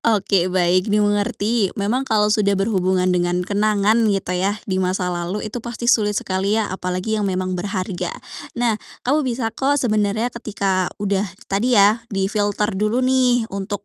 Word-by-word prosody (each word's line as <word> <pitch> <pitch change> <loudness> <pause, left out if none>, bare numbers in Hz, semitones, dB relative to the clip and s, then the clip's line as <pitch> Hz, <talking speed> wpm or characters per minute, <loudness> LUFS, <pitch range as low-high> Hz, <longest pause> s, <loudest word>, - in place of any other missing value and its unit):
Oke, 195 -5 +2
baik, 185 +2 +2
dimengerti. 205 0 +1
Memang 235 +7 -1
kalau 210 -1 +3
sudah 200 -2 +2
berhubungan 190 -2 +1
dengan 180 0 0
kenangan, 210 +2 +2
gitu 195 -3 -1
yah, 190 +3 0
di 190 -1 -1
masa 185 -1 -1
lalu 175 +4 -3
itu 220 +3 -5
pasti 235 0 -7
sulit 210 -4 +3
sekali 195 +3 0
ya, 220 -4 -1
apalagi 185 +4 -2
yang 200 - 0
memang 185 0 -2
berharga. 185 0 -3 0.5
Nah, 235 -3 0 0.2
kamu 285 +5 +2
bisa 230 -2 -2
kok 275 +5 +1
sebenarnya 220 -2 0
ketika 195 -5 -1
udah, 200 0 -1 0.2
tadi 235 +5 +2
ya, 205 +3 +5
difilter 205 +1 -1
dulu 215 +6 0
nih 255 -2 +3
untuk 200 +1 -4
205 Hz, 155 wpm, -20 LUFS, 190-220 Hz, 0.5 s, ya